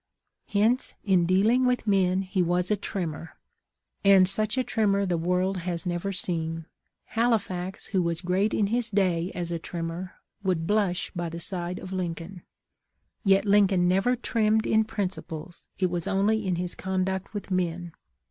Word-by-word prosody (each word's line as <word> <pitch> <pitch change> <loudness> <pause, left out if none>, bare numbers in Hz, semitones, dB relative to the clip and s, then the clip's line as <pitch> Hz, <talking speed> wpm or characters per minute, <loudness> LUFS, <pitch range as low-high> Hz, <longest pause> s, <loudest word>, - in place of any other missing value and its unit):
Hence, 220 +5 +1
in 185 -4 +3
dealing 215 +8 +3
with 250 -2 +1
men 190 -2 +2
he 190 0 -1
was 180 +2 +1
a - - +4
trimmer, 175 -5 -5 0.7
and 195 -2 +7
such 215 +4 +1
a 255 - +2
trimmer 200 -4 +1
the 180 -2 0
world 180 +3 0
has 175 -1 -3
never 175 +2 -2
seen. 165 -3 -3 0.4
Halifax, 195 -6 -1
who 190 -2 0
was 170 -1 -1
great 190 +4 +1
in 210 - +2
his 240 -1 +1
day 185 -4 +1
as 175 -1 -3
a 170 - -2
trimmer, 170 +2 -5 0.3
would 180 -5 0
blush 195 -2 0
by 175 -1 -2
the 165 +1 -6
side 175 0 -4
of 185 0 -7
Lincoln; 175 0 -4 0.8
yet 195 -1 +4
Lincoln 200 -3 +4
never 195 +7 +3
trimmed 220 -2 +1
in 220 0 +3
principles, 180 -5 -5
it 185 -2 +1
was 175 -2 -2
only 210 +2 +1
in 180 - +1
his 175 0 -2
conduct 190 +1 -2
with 200 -1 -5
men. 175 -2 -1
185 Hz, 160 wpm, -27 LUFS, 175-205 Hz, 0.8 s, and